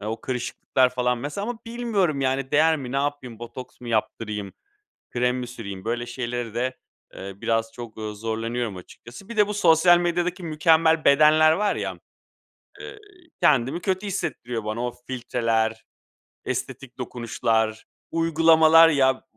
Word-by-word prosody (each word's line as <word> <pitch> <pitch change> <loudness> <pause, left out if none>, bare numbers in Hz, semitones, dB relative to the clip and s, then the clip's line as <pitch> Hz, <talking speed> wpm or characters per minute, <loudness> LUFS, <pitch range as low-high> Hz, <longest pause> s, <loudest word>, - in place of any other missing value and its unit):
o 110 +2 -4
kırışıklıklar 130 +1 0
falan, 125 -1 0
mesela, 150 - -4
ama 245 -2 -4
bilmiyorum, 215 -11 -1
yani, 135 0 -1
değer 160 +2 +4
mi? 130 -4 -7
Ne 135 - -1
yapayım, 140 -5 -3
botoks 120 +2 -10
mı 120 - -8
yaptırayım, 105 -2 -2 0.6
krem 125 +1 0
mi 125 - -4
süreyim? 100 -6 -8
Böyle 120 +1 -2
şeyleri 120 -2 -4
de, 130 +2 -2 0.4
eee, 100 +1 -7
biraz 115 +2 -1
çok, 115 -2 -10
ooo, 110 -1 -5
zorlanıyorum 115 0 -3
açıkçası. 120 - -13
Bir 235 - -8
de 210 -1 +5
bu 210 - -4
sosyal 175 -2 +5
medyadaki 175 +1 -1
mükemmel 160 0 +3
bedenler 155 +2 +6
var 205 +4 0
ya, - - -4 0.8
eee, 420 0 -9 0.4
kendimi 140 +4 +2
kötü 190 +1 -2
hissettiriyor 120 - -4
bana. 110 +3 -3
O 125 - -3
f - - -22
filtreler, 115 -3 -1 0.6
estetik 130 -2 -5
dokunuşlar, 115 -2 -1 0.3
uygulamalar, 165 0 +5
ya, 135 -4 +3
b - - -18
130 Hz, 150 wpm, -24 LUFS, 115-160 Hz, 0.8 s, bedenler